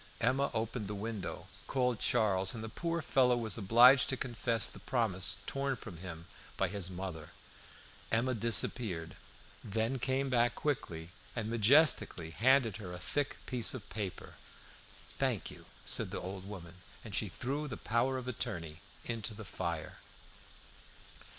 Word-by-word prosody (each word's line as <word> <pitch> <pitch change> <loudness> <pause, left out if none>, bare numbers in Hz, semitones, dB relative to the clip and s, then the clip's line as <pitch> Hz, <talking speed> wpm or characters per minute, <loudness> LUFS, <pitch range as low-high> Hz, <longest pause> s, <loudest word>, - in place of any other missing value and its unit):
Emma 130 +4 +2
opened 110 -1 -2
the 105 - -4
window, 105 -1 -5 0.2
called 125 -4 +1
Charles, 95 -2 +3
and 110 - -5
the 110 - -5
poor 170 +6 -2
fellow 125 -4 +3
was 110 -3 +1
obliged 120 +5 +6
to 135 - 0
confess 115 -2 0
the - - -6
promise 110 -8 +1
torn 140 0 -1
from 105 -8 -9
him 85 -2 -8 0.3
by - - +2
his 100 -3 -3
mother. 90 -4 -6 0.8
Emma 120 +3 +2
disappeared, 105 -6 +2 0.5
then 115 +5 -1
came 135 +2 0
back 120 -2 +2
quickly, 85 - -3 0.2
and 115 -1 -3
majestically 115 - +4
handed 120 - +3
her 95 -5 -7
a - - -5
thick 145 +9 -2
piece 125 -1 +2
of 115 -6 -8
paper. 100 -4 -5 0.8
"Thank - - 0
you," - - -13 0.2
said - - 0
the - - -4
old 95 +1 -6
woman. 90 -3 -9 0.2
And 110 - -8
she 105 - 0
threw 140 - -3
the 120 - -5
power 120 +4 0
of 125 -1 -6
attorney 85 -9 -4 0.3
into 115 -2 -3
the 110 0 -8
fire. 85 -4 -4
115 Hz, 150 wpm, -33 LUFS, 95-125 Hz, 0.8 s, obliged